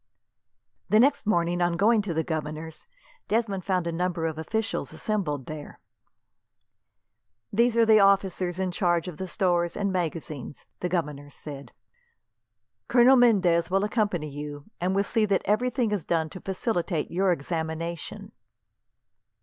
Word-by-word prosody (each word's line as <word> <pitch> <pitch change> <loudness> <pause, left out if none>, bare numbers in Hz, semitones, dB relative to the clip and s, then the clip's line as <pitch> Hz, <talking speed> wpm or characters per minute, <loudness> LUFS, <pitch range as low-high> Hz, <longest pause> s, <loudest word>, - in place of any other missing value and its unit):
The 215 - +5
next 270 -2 +3
morning, 175 -3 +1
on 175 -1 +1
going 215 +3 +4
to 200 -4 -3
the 160 - +1
governor's, 155 0 -5 0.4
Desmond 210 -4 0
found 185 -2 0
a 170 - -1
number 170 -1 -1
of 160 -1 -3
officials 220 +7 -2
assembled 160 - -2
there. 155 -1 -8 1.7
"These 235 +2 +3
are 230 - +6
the 220 -1 +6
officers 190 -3 +2
in 190 -1 -1
charge 175 -2 +1
of 175 -4 -7
the 190 - -4
stores 175 -3 0
and 200 -1 0
magazines," 160 -6 -4
the 180 - -2
governor 150 -5 -3
said. 140 -1 -9 1.2
"Colonel 250 +2 +6
Mendez 185 -9 +4
will 195 +2 +2
accompany 205 -7 0
you, 145 0 -7
and 185 +2 0
will 200 - +3
see 215 +1 +1
that 200 -2 +1
everything 240 +1 +1
is 205 -6 -1
done 160 -2 -1
to 185 - -9
facilitate 185 -4 -2
your 185 +2 +2
examination." 165 +1 -4
180 Hz, 140 wpm, -26 LUFS, 160-205 Hz, 1.7 s, are